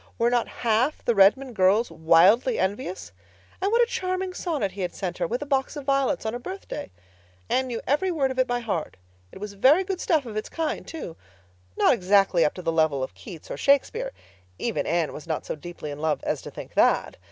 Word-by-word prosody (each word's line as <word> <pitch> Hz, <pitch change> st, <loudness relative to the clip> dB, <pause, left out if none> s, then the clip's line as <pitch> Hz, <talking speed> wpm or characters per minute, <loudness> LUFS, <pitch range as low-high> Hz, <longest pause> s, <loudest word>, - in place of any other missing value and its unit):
Were 235 Hz, +1 st, +2 dB
not 240 Hz, -1 st, +1 dB, 0.2 s
half 235 Hz, +6 st, +1 dB
the 240 Hz, -, +3 dB
Redmond 230 Hz, +6 st, +4 dB
girls 200 Hz, +4 st, +3 dB
wildly 185 Hz, +10 st, +4 dB
envious? 190 Hz, -, -3 dB, 0.5 s
And 395 Hz, +2 st, +1 dB
what 475 Hz, +1 st, +5 dB
a -, -, +3 dB
charming 370 Hz, -4 st, -2 dB
sonnet 300 Hz, -, -2 dB
he 195 Hz, +1 st, -7 dB
had 180 Hz, -, -3 dB
sent 185 Hz, -2 st, -4 dB
her, 175 Hz, -, 0 dB
with 245 Hz, -, -2 dB
a -, -, -8 dB
box 270 Hz, +1 st, 0 dB
of 290 Hz, -2 st, -7 dB
violets, 275 Hz, -2 st, +1 dB
on 220 Hz, -, -1 dB
her 245 Hz, -, -4 dB
birthday! 370 Hz, -, -7 dB, 0.6 s
Anne 260 Hz, 0 st, +2 dB
knew 235 Hz, -2 st, -4 dB
every 295 Hz, +8 st, +1 dB
word 285 Hz, -6 st, 0 dB
of 260 Hz, -, -4 dB
it 255 Hz, -, +3 dB
by 245 Hz, 0 st, -1 dB
heart. 190 Hz, -, -3 dB, 0.3 s
It -, -, -11 dB
was 205 Hz, 0 st, -6 dB
very 270 Hz, -, +5 dB
good 375 Hz, -1 st, -4 dB
stuff 310 Hz, -5 st, +1 dB
of 225 Hz, -3 st, -7 dB
its 215 Hz, -, -3 dB
kind, 325 Hz, -1 st, -3 dB
too. 300 Hz, -, -7 dB, 0.6 s
Not -, -, +5 dB
exactly 195 Hz, -4 st, +3 dB
up 150 Hz, -, +1 dB
to 180 Hz, -, -8 dB
the 165 Hz, -, +1 dB
level 155 Hz, -4 st, +2 dB
of 130 Hz, -, -5 dB
Keats 175 Hz, -8 st, -11 dB
or -, -, -4 dB
Shakespeare—even 280 Hz, -, -1 dB
Anne 165 Hz, -1 st, 0 dB
was 155 Hz, -, -9 dB
not 160 Hz, -2 st, -3 dB
so -, -, -3 dB
deeply 155 Hz, -1 st, -8 dB
in 145 Hz, -, -7 dB
love 155 Hz, -1 st, 0 dB
as -, -, -2 dB
to -, -, -8 dB
think -, -, -10 dB
that. -, -, +2 dB
230 Hz, 220 wpm, -25 LUFS, 175-280 Hz, 0.6 s, what